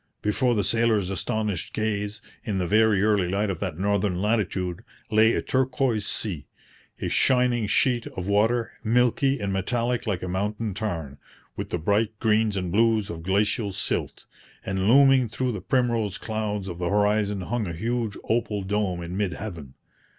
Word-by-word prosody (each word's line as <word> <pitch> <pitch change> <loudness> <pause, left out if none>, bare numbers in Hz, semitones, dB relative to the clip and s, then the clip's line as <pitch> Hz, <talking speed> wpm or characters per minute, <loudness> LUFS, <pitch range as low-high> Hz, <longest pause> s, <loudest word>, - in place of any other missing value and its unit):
Before 120 +4 +1
the 105 - +1
sailors' 110 -2 +1
astonished 105 0 -2
gaze, 105 0 -2 0.2
in 105 -4 -2
the 90 - 0
very 105 +1 +3
early 105 -4 +2
light 100 +2 0
of 90 - -5
that 90 -6 -3
northern 100 -1 0
latitude, 100 -3 -1 0.3
lay 110 +1 +5
a - - -1
turquoise 130 -4 0
sea 85 -12 -3 0.5
a - - -2
shining 125 -3 +2
sheet 120 +2 +2
of 90 - -6
water, 110 +4 +2
milky 125 +4 +2
and 100 -1 -2
metallic 120 +5 -1
like 95 -4 -1
a - - -3
mountain 105 +3 -2
tarn, 85 -9 -4 0.4
with - - -5
the - - -1
bright 105 +6 0
greens 110 -2 +2
and 90 -2 -2
blues 110 0 +2
of 85 -1 -7
glacial 100 +4 0
silt; 95 - -3 0.4
and 95 +1 0
looming 135 -1 +6
through 125 +3 -1
the 105 -5 -5
primrose 115 -3 0
clouds 105 -3 -3
of 90 -2 -6
the 90 -1 -1
horizon 105 -1 +1
hung 115 +2 -2
a 85 - -4
huge 115 +4 -2
opal 110 -3 -1
dome 95 -3 -1
in 85 +2 -6
mid 100 -3 -1
heaven. 85 -11 -7
105 Hz, 165 wpm, -25 LUFS, 95-115 Hz, 0.5 s, looming